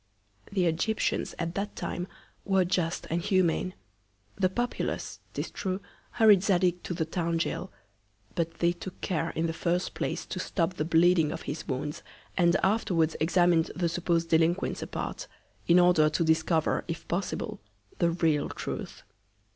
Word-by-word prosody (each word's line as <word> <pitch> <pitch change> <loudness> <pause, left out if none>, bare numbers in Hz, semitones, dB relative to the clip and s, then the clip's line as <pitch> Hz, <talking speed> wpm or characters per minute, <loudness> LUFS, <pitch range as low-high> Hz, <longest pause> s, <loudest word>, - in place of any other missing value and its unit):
The 190 -3 +1
Egyptians 175 +7 0
at 170 -1 -2
that 200 +2 -3
Time 180 +1 -4 0.4
were 190 -2 +3
just 175 -2 -1
and 170 +1 +1
humane. 185 -1 +1 0.6
The 185 -1 +2
Populace, 240 +6 -3 0.2
tis - - -3
true, 190 -1 -2 0.3
hurried 215 -5 +6
Zadig 180 -2 +2
to 175 - -3
the 160 - 0
Town 165 0 -1
Goal; 180 +3 -2 0.6
but 165 -1 -2
they 170 +1 +2
took 180 +1 -8
care 165 -2 -1
in 165 - 0
the 165 - -1
first 175 +2 -1
Place - - -3
to - - -5
stop 175 -1 0
the 155 -4 -2
Bleeding 165 -1 +4
of - - -5
his 150 +2 -5
Wounds, 140 +2 -3 0.3
and 170 -2 +4
afterwards 185 -6 +2
examin'd 175 0 +3
the 175 -1 +1
suppos'd 170 0 0
Delinquents 165 +3 +2
apart, - - -5 0.4
in 170 - +6
order 175 -4 +5
to 155 +2 0
discover, 160 0 +2
if 165 -1 -5
possible, 180 +3 -3 0.4
the 170 - +3
real 160 -4 +1
Truth. - - -6
170 Hz, 155 wpm, -28 LUFS, 165-185 Hz, 0.6 s, hurried